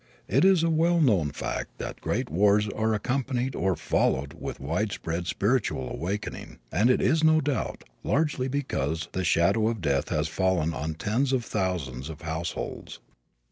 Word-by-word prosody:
It - - +3
is 190 -3 +5
a 165 - +3
well 170 +2 +3
known 100 - +3
fact - - -5
that - - -6
great - - -1
wars 105 +4 +4
are 110 +2 0
accompanied 130 +3 -1
or 95 -1 0
followed 70 -3 0
with - - -6
widespread 85 +1 -2
spiritual 100 - 0
awakening, 100 +9 -4
and 115 +4 +3
it 125 - +3
is 160 0 +3
no 155 0 +6
doubt 145 -2 -2 0.2
largely 145 -3 +1
because 80 - -2
the 95 - -2
shadow 95 +6 +3
of 115 -1 -1
death 70 -5 0
has 75 0 0
fallen 85 -2 +1
on 80 +1 -3
tens 115 - 0
of 125 -3 0
thousands 80 - -2
of 80 -1 -8
households. 80 +1 -5
100 Hz, 160 wpm, -27 LUFS, 80-130 Hz, 0.2 s, no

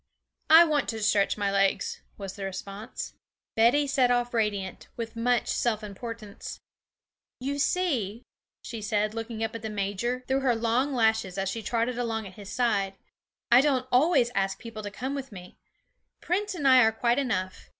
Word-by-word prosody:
'I 325 +2 +9
want 300 -4 0
to 220 -2 -3
stretch 205 -1 +2
my 200 -1 0
legs,' 195 0 +1 0.2
was 195 -2 -6
the 200 - -7
response. 195 +4 -6 0.4
Betty 240 +6 +4
set 270 -3 +2
off 245 0 +1
radiant, 205 -5 -1
with 230 0 -5
much 240 +1 +1
self 220 -3 0
importance. 215 0 -7 0.8
'You 280 +3 -3
see,' 255 - 0 0.4
she 230 -3 -6
said, 210 0 0
looking 225 0 -4
up 225 - -2
at 230 - -6
the 220 - -4
major 210 +5 -2
through 265 0 +2
her 260 -3 +2
long 235 +5 +1
lashes 220 -5 +1
as 195 0 0
she 225 +4 -4
trotted 235 +2 -1
along 225 -2 -2
at 190 - -10
his 200 0 -10
side, 200 -6 +1 0.6
'I 245 +2 +8
don't 265 -3 +1
always 250 -2 +4
ask 195 -2 0
people 230 -2 -8
to 205 - -5
come 255 +7 -4
with 270 -2 -5
me; 180 -2 -11 0.6
Prince 395 +3 -1
and 290 -5 0
I 260 -1 +8
are 220 - +4
quite 235 +3 +1
enough. 185 -9 -2
230 Hz, 175 wpm, -27 LUFS, 205-255 Hz, 0.8 s, I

